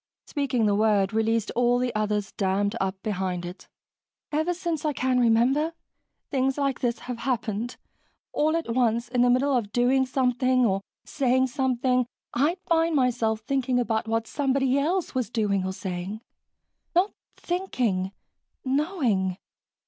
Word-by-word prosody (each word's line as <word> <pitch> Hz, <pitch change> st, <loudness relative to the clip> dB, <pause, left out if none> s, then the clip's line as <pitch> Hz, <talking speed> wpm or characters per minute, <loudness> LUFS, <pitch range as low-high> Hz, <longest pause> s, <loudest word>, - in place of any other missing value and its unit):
Speaking 270 Hz, -6 st, 0 dB
the 205 Hz, -, +3 dB
word 205 Hz, -1 st, +2 dB
released 225 Hz, 0 st, +1 dB
all 245 Hz, 0 st, +3 dB
the 245 Hz, -1 st, -1 dB
others 210 Hz, -1 st, -1 dB
dammed 200 Hz, +2 st, 0 dB
up 190 Hz, 0 st, -1 dB
behind 185 Hz, -4 st, -2 dB
it. 180 Hz, +2 st, -9 dB, 0.6 s
"Ever 315 Hz, +3 st, +1 dB
since 340 Hz, -3 st, -2 dB
I 305 Hz, -1 st, 0 dB
can 255 Hz, -1 st, +1 dB
remember, 250 Hz, +7 st, +3 dB, 0.6 s
things 270 Hz, -1 st, +1 dB
like 275 Hz, -2 st, 0 dB
this 240 Hz, -2 st, 0 dB
have 245 Hz, -2 st, -5 dB
happened 235 Hz, -2 st, -2 dB, 0.6 s
all 310 Hz, +2 st, +2 dB
at 325 Hz, -8 st, -2 dB
once, 235 Hz, -1 st, +1 dB
in 245 Hz, 0 st, +1 dB
the 245 Hz, -, +5 dB
middle 260 Hz, +3 st, +3 dB
of 215 Hz, -5 st, -1 dB
doing 255 Hz, +3 st, +3 dB
something 255 Hz, -1 st, +2 dB
or 195 Hz, -2 st, +1 dB, 0.2 s
saying 260 Hz, -2 st, +2 dB
something, 255 Hz, -1 st, +1 dB, 0.3 s
I'd 295 Hz, +9 st, +2 dB
find 330 Hz, -2 st, +2 dB
myself 235 Hz, -4 st, +1 dB
thinking 255 Hz, +1 st, 0 dB
about 225 Hz, -2 st, 0 dB
what 225 Hz, 0 st, 0 dB
somebody 270 Hz, 0 st, +1 dB
else 340 Hz, +5 st, 0 dB
was 255 Hz, -5 st, -1 dB
doing 205 Hz, -5 st, 0 dB
or 190 Hz, -, -2 dB
saying. 190 Hz, +3 st, -5 dB, 0.7 s
Not 370 Hz, +4 st, +3 dB, 0.3 s
thinking 245 Hz, -, -1 dB, 0.5 s
knowing. 260 Hz, -, 0 dB
245 Hz, 145 wpm, -26 LUFS, 215-270 Hz, 0.7 s, the